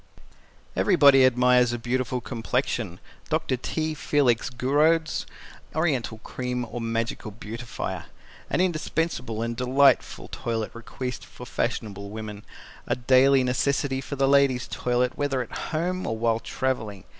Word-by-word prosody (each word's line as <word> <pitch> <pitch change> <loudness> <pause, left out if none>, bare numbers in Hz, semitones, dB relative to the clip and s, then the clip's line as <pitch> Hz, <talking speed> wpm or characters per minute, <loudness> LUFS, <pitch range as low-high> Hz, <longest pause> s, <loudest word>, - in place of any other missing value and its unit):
Everybody 140 -8 +6
Admires 125 -1 +4
a - - -1
Beautiful 125 +1 -1
Complexion. 120 -5 -2 0.3
DR. 130 - 0
T. 155 -1 -2
FELIX 135 -6 +1
GOURAUD'S 150 +6 +2 0.5
Oriental 140 -8 0
Cream 125 -1 -3
or 120 - -5
Magical 115 -1 -2
Beautifier 115 +2 -6 0.4
An 160 - +1
Indispensable 160 -9 -1
and 115 0 -2
Delightful 130 +3 +3
Toilet 115 -2 -3
Requisite 125 +2 -6
for 125 - -11
Fashionable 100 -5 -3
Women. 105 -1 -7 0.4
A - - +1
daily 130 +2 +5
necessity 135 +1 0
for 140 - -5
the 135 0 +2
ladies' 135 -3 +3
toilet 125 +1 0
whether 145 -2 0
at - - -15 0.2
home 180 +4 -1
or 110 - -2
while 115 0 +1
traveling. 110 -5 -3
125 Hz, 125 wpm, -26 LUFS, 115-140 Hz, 0.5 s, Everybody